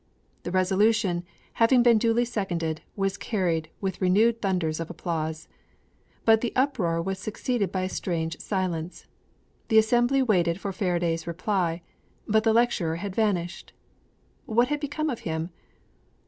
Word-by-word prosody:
The - - -5
resolution, 190 0 +2 0.3
having 240 +2 +4
been 235 -2 +5
duly 230 +2 +2
seconded, 175 -9 -2
was 195 -1 -1
carried 170 -7 -1
with 190 -2 -3
renewed 220 +5 +3
thunders 180 -6 0
of 165 - -4
applause. 160 -2 -4 0.8
But 225 -1 +5
the 240 - -1
uproar 215 -12 +1
was 190 +3 -3
succeeded 215 -1 -2
by 185 - -1
a - - 0
strange 165 -4 -3
silence. 180 -4 -3 0.6
The 220 - +3
assembly 240 +4 +4
waited 180 -7 +2
for 195 0 -4
Faraday's 170 -3 -1
reply; 170 -1 -1 0.4
but 220 0 +3
the 225 - +4
lecturer 220 -8 +2
had 190 +3 -5
vanished! 180 -6 -1 0.7
What 240 +3 +2
had 295 0 0
become 300 +1 -2
of 240 - -4
him? 160 +2 -3
190 Hz, 140 wpm, -26 LUFS, 170-225 Hz, 0.8 s, been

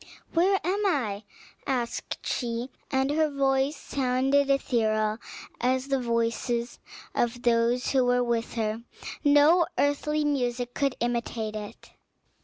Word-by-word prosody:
"Where 375 +3 +3
am 395 +4 0
I?" 220 - -1 0.4
asked 245 -4 -3
she, 240 +1 -2 0.2
and 265 0 +1
her 310 +1 +2
voice 275 0 +1
sounded 270 +2 +1
ethereal, 220 -5 +1 0.4
as 260 +2 0
the 270 -1 +2
voice 235 0 -1 0.4
of 240 +1 -1
those 235 +1 +2
who 260 -2 +3
were 245 0 +3
with 235 -1 -1
her; 220 0 -1 0.4
no 295 +4 +5
earthly 300 +1 +1
music 245 -4 -1
could 275 -2 0
imitate 235 -2 -2
it. 210 -1 -8
250 Hz, 120 wpm, -27 LUFS, 235-280 Hz, 0.4 s, no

